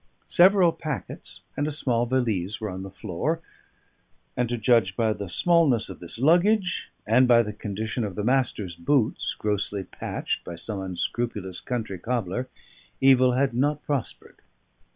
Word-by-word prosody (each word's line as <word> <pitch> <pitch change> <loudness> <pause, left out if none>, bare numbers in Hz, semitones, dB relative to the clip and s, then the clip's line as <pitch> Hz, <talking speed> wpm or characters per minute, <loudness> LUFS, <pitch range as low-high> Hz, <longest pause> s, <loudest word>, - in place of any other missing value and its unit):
Several 185 -1 +6
packets 150 -5 -7
and 145 - -1
a - - -2
small 120 -5 0
valise 110 -5 -1
were 110 -3 -4
on 95 +1 -6
the 95 - -7
floor; 105 - -3 1.0
and 125 -1 0
to 120 - -1
judge 110 -4 +3
by 110 -2 +1
the 100 -3 -7
smallness 150 - +3
of 95 - -9
this 85 +4 -7
luggage, 175 - +2 0.2
and 125 +4 +4
by 120 -1 +6
the 105 -1 -5
condition 110 +2 -4
of 100 -4 -4
the 105 - -3
Master's 120 -7 0
boots, 110 +7 0
grossly 105 -1 -2
patched - - -4
by 85 - -7
some 100 +3 -3
unscrupulous 95 +1 -3
country 110 -7 -4
cobbler, 120 +2 -2 0.5
evil 130 -2 +5
had 130 0 +1
not 145 +4 0
prospered. 140 -5 -4
115 Hz, 150 wpm, -25 LUFS, 100-135 Hz, 1.0 s, Several